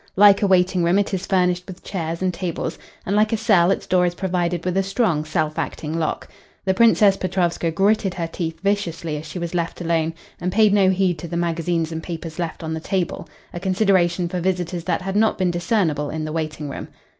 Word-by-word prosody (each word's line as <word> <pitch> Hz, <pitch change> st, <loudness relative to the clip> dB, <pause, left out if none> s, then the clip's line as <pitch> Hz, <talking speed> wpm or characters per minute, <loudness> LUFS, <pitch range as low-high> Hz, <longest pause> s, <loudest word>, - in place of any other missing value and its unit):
Like 200 Hz, 0 st, +7 dB
a 205 Hz, -, +3 dB
waiting 185 Hz, -1 st, +3 dB
room 170 Hz, +3 st, +3 dB
it 205 Hz, 0 st, 0 dB
is 190 Hz, 0 st, -2 dB
furnished 180 Hz, -1 st, +1 dB
with 185 Hz, -2 st, -10 dB
chairs 165 Hz, -2 st, -4 dB
and 185 Hz, -1 st, +1 dB
tables, 170 Hz, -1 st, -4 dB, 0.3 s
and 200 Hz, -, 0 dB
like 215 Hz, +1 st, +3 dB
a 225 Hz, -, +1 dB
cell 205 Hz, -6 st, +4 dB
its 195 Hz, -, 0 dB
door 180 Hz, -1 st, +3 dB
is 175 Hz, -, -3 dB
provided 175 Hz, -2 st, -1 dB
with 180 Hz, 0 st, -1 dB
a 195 Hz, -, +3 dB
strong, 195 Hz, -5 st, 0 dB
self 155 Hz, 0 st, -1 dB
acting 160 Hz, +1 st, -3 dB
lock. 160 Hz, -, -2 dB, 0.4 s
The 190 Hz, -, +2 dB
Princess 210 Hz, -1 st, +5 dB
Petrovska 175 Hz, -2 st, 0 dB
gritted 195 Hz, +2 st, +1 dB
her 170 Hz, -2 st, -2 dB
teeth 165 Hz, -1 st, -4 dB
viciously 170 Hz, -6 st, -1 dB
as 155 Hz, +1 st, -8 dB
she 155 Hz, -, -7 dB
was 170 Hz, -1 st, -4 dB
left 170 Hz, -1 st, -2 dB
alone, 165 Hz, -1 st, 0 dB, 0.2 s
and 180 Hz, +1 st, -2 dB
paid 215 Hz, 0 st, +4 dB
no 195 Hz, -2 st, +5 dB
heed 185 Hz, -3 st, +1 dB
to 170 Hz, -, -6 dB
the 170 Hz, -, -3 dB
magazines 170 Hz, -1 st, -1 dB
and 160 Hz, 0 st, -4 dB
papers 165 Hz, -1 st, -7 dB
left 165 Hz, -1 st, -4 dB
on 160 Hz, 0 st, -3 dB
the 160 Hz, -, -3 dB
table 180 Hz, +2 st, -2 dB, 0.2 s
a 175 Hz, -, -4 dB
consideration 185 Hz, -2 st, +2 dB
for 180 Hz, +1 st, -3 dB
visitors 175 Hz, -1 st, -2 dB
that 180 Hz, 0 st, -1 dB
had 195 Hz, +1 st, -3 dB
not 220 Hz, +1 st, +3 dB
been 185 Hz, -2 st, +1 dB
discernible 170 Hz, -5 st, 0 dB
in 155 Hz, 0 st, -3 dB
the 155 Hz, -, -4 dB
waiting 155 Hz, -2 st, -3 dB
room. 140 Hz, -, -6 dB
175 Hz, 220 wpm, -22 LUFS, 165-190 Hz, 0.4 s, Like